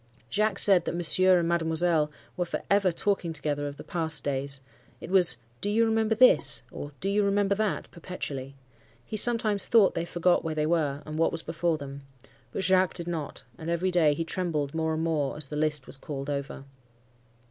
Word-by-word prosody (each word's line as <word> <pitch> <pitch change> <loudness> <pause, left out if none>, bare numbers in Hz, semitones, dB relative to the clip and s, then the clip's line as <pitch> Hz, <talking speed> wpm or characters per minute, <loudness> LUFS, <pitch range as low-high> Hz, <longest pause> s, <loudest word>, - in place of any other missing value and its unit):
Jacques 215 -2 0
said 190 -5 +6
that - - -3
Monsieur 185 +2 +4
and 170 -1 0
Mademoiselle 165 -2 +1 0.2
were 180 - -1
for 175 - -5
ever 200 -2 +3
talking 175 -1 -1
together 145 -1 -2
of 140 0 -8
the - - -10
past 160 -3 -3
days,—it 135 -1 -6
was 180 -10 +5 0.2
'Do 205 - -2
you 225 +2 +2
remember 220 0 0
this?' 255 +3 +4
or, 145 - -8
'Do 195 - -3
you 205 +1 +1
remember 200 0 +1
that?' 210 0 -2
perpetually. 140 -6 -7 0.5
He - - -7
sometimes 215 -2 +5
thought 225 -4 +4
they 165 - -3
forgot 175 +1 0
where 160 -1 -4
they 150 0 -1
were, 155 -3 -1
and 155 0 -6
what 165 - +2
was 165 - -4
before 165 0 -2
them. 140 -1 -9 0.5
But 190 - -4
Jacques 185 -1 +2
did 170 -1 -6
not, 160 -4 -6 0.2
and 160 - -6
every 175 +2 -1
day 160 -5 +3
he 165 - -3
trembled 155 -5 -3
more 160 0 -2
and 160 - -3
more 150 -5 -2
as 150 -3 -6
the 150 - -6
list 150 -3 -1
was - - -2
called 140 0 -6
over. 140 -1 -5
165 Hz, 195 wpm, -26 LUFS, 150-185 Hz, 0.5 s, said